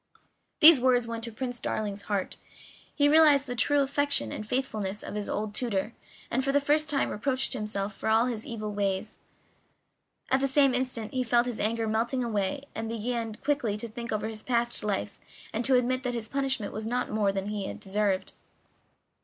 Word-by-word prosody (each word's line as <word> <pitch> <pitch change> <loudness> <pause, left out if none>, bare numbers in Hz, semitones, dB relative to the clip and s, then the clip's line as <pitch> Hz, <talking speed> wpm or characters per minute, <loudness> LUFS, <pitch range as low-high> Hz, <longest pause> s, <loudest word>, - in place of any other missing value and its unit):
These 315 -2 +10
words 245 -2 +3
went 230 0 -5
to 230 - -6
Prince 245 +2 -4
Darling's 205 -2 -3
heart; 200 -2 -2 0.6
he 290 - +4
realized 295 -2 +6
the 245 - -4
true 290 +4 +3
affection 280 - 0
and - - -5
faithfulness 215 -6 -2
of - - -6
his 210 -1 -4
old 210 0 -2
tutor, 220 -2 -2 0.4
and 260 +2 +1
for 275 - +1
the 285 - +4
first 295 +2 +2
time 280 -1 +1
reproached 260 +5 0
himself 210 -4 -3
for 220 - -3
all 225 +2 +4
his 235 -3 -3
evil 215 -3 -5
deeds; 200 +1 -2 1.1
at 265 - +4
the 275 - +1
same 275 -1 +4
instant 250 -4 -2
he 255 -1 0
felt 240 0 +3
all 245 - -1
his 225 - -8
anger 225 +1 0
melting 235 +4 0
away, 215 +3 -1
and 225 0 -4
he 230 - -3
began 230 -1 -3
quickly 260 -6 -1
to 235 - -6
think 235 +1 -7
over 215 0 -1
his 220 -1 -6
past 240 0 0
life, 205 -1 -2 0.3
and 230 +2 -1
to 270 - +4
admit 255 +1 +1
that 250 -2 -2
his 225 -2 -3
punishment 265 -5 -1
was 215 +1 -4
not 250 +2 -1
more 210 -2 +2
than 195 +1 -3
he 205 -2 -3
had - - -7
deserved. 195 -1 -1
230 Hz, 200 wpm, -28 LUFS, 210-260 Hz, 1.1 s, These